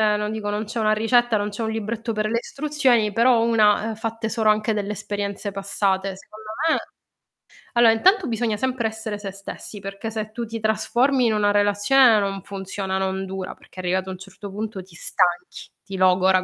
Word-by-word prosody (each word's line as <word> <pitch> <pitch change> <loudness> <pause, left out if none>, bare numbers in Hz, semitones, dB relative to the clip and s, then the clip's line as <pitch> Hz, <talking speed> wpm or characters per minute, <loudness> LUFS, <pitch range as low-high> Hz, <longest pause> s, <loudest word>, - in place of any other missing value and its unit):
non 210 0 -2
dico 210 -2 -3
non 210 +1 -2
c'è 230 +2 -4
una 215 -1 +3
ricetta, 235 +1 +3
non 205 0 0
c'è 210 +3 -5
un 220 - -1
libretto 225 +1 -3
per 215 0 -1
le 230 +2 0
istruzioni, 265 -7 +1
però 235 +2 +4
una, 215 -2 +3
ehm, 220 - -4
fatte 225 0 -4
solo 220 -2 +3
anche 215 +1 0
delle 205 0 -2
esperienze 205 0 -4
passate, 195 -1 -1
secondo 215 +2 -13 0.2
me - - +3 1.0
allora, 235 -2 +6
intanto 375 - +3
bisogna 225 -2 -1
sempre 255 -1 -1
essere 220 -1 -5
se 200 -2 -6
stessi, 195 +1 -8
perché 200 +3 -6
se 215 -1 -4
tu 235 +1 -4
ti 225 0 -6
trasformi 245 +4 +2
in 225 - +3
una 205 -1 +2
relazione 205 +4 +4
non 195 -2 -2
funziona, 190 -1 -4
non 190 0 -2
dura, 190 0 -6
perché - - -16
arrivato 185 +1 -1
a - - -3
un 185 - -6
certo 195 +1 -10
punto 210 -2 -5
ti 185 - -20
stanchi, 175 +1 -1
ti 195 -1 -7
logora 185 0 +4
215 Hz, 195 wpm, -23 LUFS, 195-225 Hz, 1.0 s, allora